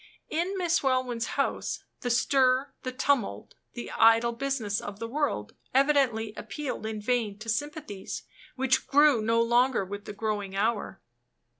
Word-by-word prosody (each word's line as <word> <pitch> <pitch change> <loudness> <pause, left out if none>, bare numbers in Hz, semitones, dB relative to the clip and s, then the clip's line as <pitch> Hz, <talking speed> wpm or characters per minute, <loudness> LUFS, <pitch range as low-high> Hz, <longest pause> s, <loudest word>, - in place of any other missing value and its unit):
In 350 +5 -1
Miss 350 -2 +2
Welwyn's 255 -3 0
house, - - -1 0.2
the 245 - -3
stir, 260 +2 +3
the 255 - -4
tumult, 255 - 0 0.2
the 240 - -6
"idle 230 +1 +5
business" 235 -4 -2
of 205 -1 -7
the 230 - -4
world 255 - -2 0.2
evidently 265 -6 +3
appealed 285 -7 -5
in 220 -1 -4
vain 215 -2 0
to 220 +2 -10
sympathies 290 - -4 0.3
which 265 -1 +1
grew 290 -4 +5
no 230 +2 +2
longer 240 -2 +3
with 205 +2 -7
the - - -6
growing 205 -2 -3
hour. 210 -1 -1
240 Hz, 145 wpm, -28 LUFS, 220-275 Hz, 0.3 s, idle